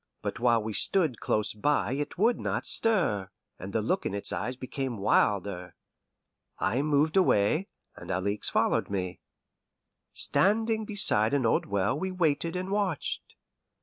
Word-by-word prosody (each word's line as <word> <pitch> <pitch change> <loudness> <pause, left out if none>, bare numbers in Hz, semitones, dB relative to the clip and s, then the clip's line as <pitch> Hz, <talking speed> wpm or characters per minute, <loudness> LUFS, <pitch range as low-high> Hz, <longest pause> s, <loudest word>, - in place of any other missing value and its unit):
But - - -4
while 120 -2 +3
we 110 0 -4
stood 155 - +2
close 105 -1 0
by 145 +5 0
it 145 +2 -3
would 230 +6 +2
not - - -2
stir, 170 - +1 0.3
and 95 +2 -7
the 110 0 -1
look 185 - 0
in 100 - -3
its 100 - -4
eyes 105 +9 -3
became 130 -1 -4
wilder. 100 -2 0 0.8
I 125 - 0
moved 150 +2 +1
away, 160 - +3 0.3
and - - -11
Alixe 100 +3 0
followed - - +1
me. 90 -2 -3 0.9
Standing 220 +2 +1
beside 145 - +2
an 135 -4 +1
old 110 - +1
well 100 +7 0
we 190 +2 -2
waited 165 -1 0
and 185 +1 -3
watched. 200 -7 -2
130 Hz, 150 wpm, -28 LUFS, -, 0.9 s, while